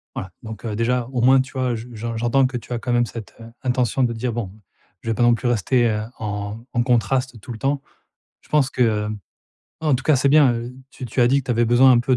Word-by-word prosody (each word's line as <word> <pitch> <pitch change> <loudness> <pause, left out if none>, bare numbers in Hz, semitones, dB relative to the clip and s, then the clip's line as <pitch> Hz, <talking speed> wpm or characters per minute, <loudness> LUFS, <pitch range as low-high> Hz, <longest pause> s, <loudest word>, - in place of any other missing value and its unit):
Voila. 95 - -5
Donc, 110 -1 -8
heu, 110 -2 -3
déjà 120 +2 0
au 125 - -1
moins 130 +2 +6
tu 130 - -9
vois, 130 -2 0
je 115 +1 -7
je 115 +1 -5
j'entends 120 +4 +2
que 125 - -4
tu 120 +1 -7
as 120 - -2
quand 125 - -3
même 120 0 +3
cette, 115 -2 -9
heu, 115 - -10 0.2
intention 125 0 +1
de 120 -1 +1
dire: 120 +1 -3
«Bon, 110 -5 -4 0.5
je 115 - -5
vais - - +2
pas 120 - -3
non 120 - +5
plus 125 - -3
rester, 120 +2 +2
heu, 105 -1 -1 0.2
en 105 -1 -4 0.2
en 120 - +2
contraste 125 0 0
tout 105 - -9
le 115 - -6
temps». 140 +3 0 0.6
Je - - -25
pense 145 -3 +3
que, 125 - -4
hem, 105 -2 +2 0.7
ouais, 155 - 0
en 145 - +4
tout 130 - -1
cas 155 - +4
c'est 135 +2 +2
bien, 145 -4 +6
heu, 120 +2 -5 0.2
tu 130 - -9
tu 125 +2 -2
as 120 - +6
dit 140 +2 +3
que - - -14
tu - - -2
avais 120 0 +2
besoin 120 +3 +6
un 120 - +6
peu 130 +1 +2
120 Hz, 275 wpm, -22 LUFS, 115-130 Hz, 0.7 s, moins